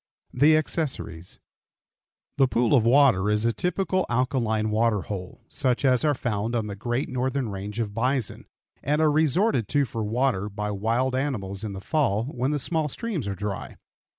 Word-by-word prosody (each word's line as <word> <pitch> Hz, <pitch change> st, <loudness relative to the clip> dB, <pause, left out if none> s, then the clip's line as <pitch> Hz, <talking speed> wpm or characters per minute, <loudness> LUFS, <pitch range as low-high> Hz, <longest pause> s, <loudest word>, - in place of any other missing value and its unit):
THE 150 Hz, +5 st, +5 dB
ACCESSORIES. 135 Hz, -, -3 dB, 1.0 s
The 135 Hz, -1 st, +5 dB
pool 120 Hz, 0 st, +1 dB
of 115 Hz, -5 st, +4 dB
water 120 Hz, -7 st, +5 dB
is 105 Hz, +1 st, +2 dB
a 115 Hz, -, +2 dB
typical 185 Hz, -, -1 dB
alkaline 120 Hz, -3 st, 0 dB
water 110 Hz, -1 st, +2 dB
hole, 95 Hz, -2 st, -7 dB
such 130 Hz, -1 st, 0 dB
as 125 Hz, -2 st, +3 dB
are 150 Hz, -2 st, +2 dB
found 115 Hz, -1 st, -2 dB
on 115 Hz, -2 st, 0 dB
the 100 Hz, -1 st, -5 dB
great 120 Hz, +6 st, -2 dB
northern 130 Hz, -1 st, -1 dB
range 100 Hz, +2 st, -5 dB
of 105 Hz, -3 st, -2 dB
bison, 125 Hz, +1 st, -1 dB, 0.3 s
and 150 Hz, +3 st, 0 dB
are 155 Hz, -1 st, +4 dB
resorted 155 Hz, -, +2 dB
to 145 Hz, +3 st, +2 dB
for 115 Hz, -3 st, -4 dB
water 110 Hz, -2 st, 0 dB
by 105 Hz, +1 st, -4 dB
wild 115 Hz, +6 st, 0 dB
animals 110 Hz, -8 st, -2 dB
in 105 Hz, -2 st, -4 dB
the 95 Hz, -, -7 dB
fall 115 Hz, -6 st, +1 dB
when 130 Hz, -1 st, -2 dB
the 150 Hz, -, 0 dB
small 155 Hz, +2 st, -1 dB
streams 185 Hz, -, -3 dB
are 100 Hz, -, -2 dB
dry. 100 Hz, 0 st, -5 dB
120 Hz, 175 wpm, -25 LUFS, 105-140 Hz, 1.0 s, THE